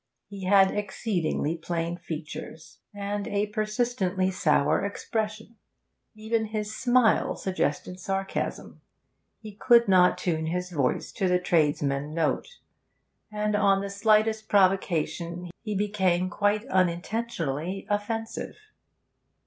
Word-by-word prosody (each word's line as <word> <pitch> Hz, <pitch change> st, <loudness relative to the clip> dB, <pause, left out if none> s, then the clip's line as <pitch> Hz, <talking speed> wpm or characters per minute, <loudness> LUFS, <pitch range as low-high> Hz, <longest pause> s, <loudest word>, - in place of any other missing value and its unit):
He 195 Hz, -2 st, -8 dB
had 195 Hz, 0 st, +5 dB
exceedingly 190 Hz, -6 st, -1 dB
plain 165 Hz, +1 st, -3 dB
features, 160 Hz, -1 st, -8 dB
and 205 Hz, 0 st, -4 dB
a 205 Hz, +1 st, 0 dB
persistently 210 Hz, -3 st, -1 dB
sour 155 Hz, -4 st, +2 dB
expression; 215 Hz, +2 st, -4 dB, 0.6 s
even 220 Hz, +1 st, -1 dB
his 215 Hz, 0 st, -4 dB
smile 245 Hz, -2 st, +3 dB
suggested 180 Hz, -1 st, -2 dB
sarcasm. 195 Hz, +1 st, -3 dB, 0.6 s
He 215 Hz, -1 st, -8 dB
could 235 Hz, +2 st, +4 dB
not 185 Hz, -2 st, +5 dB
tune 160 Hz, -3 st, -1 dB
his 180 Hz, +2 st, -3 dB
voice 140 Hz, -6 st, -1 dB
to 190 Hz, -, -1 dB
the 180 Hz, 0 st, +3 dB
tradesman 150 Hz, -4 st, 0 dB
note, 165 Hz, -, 0 dB, 0.8 s
and 210 Hz, 0 st, -1 dB
on 195 Hz, -1 st, +3 dB
the 200 Hz, 0 st, -4 dB
slightest 215 Hz, +1 st, +2 dB
provocation 180 Hz, -3 st, +1 dB
he 215 Hz, -2 st, -4 dB
became, 190 Hz, -3 st, +1 dB
quite 205 Hz, +3 st, +1 dB
unintentionally, 185 Hz, -, -1 dB
offensive. 220 Hz, +2 st, -3 dB
195 Hz, 110 wpm, -27 LUFS, 175-215 Hz, 0.8 s, had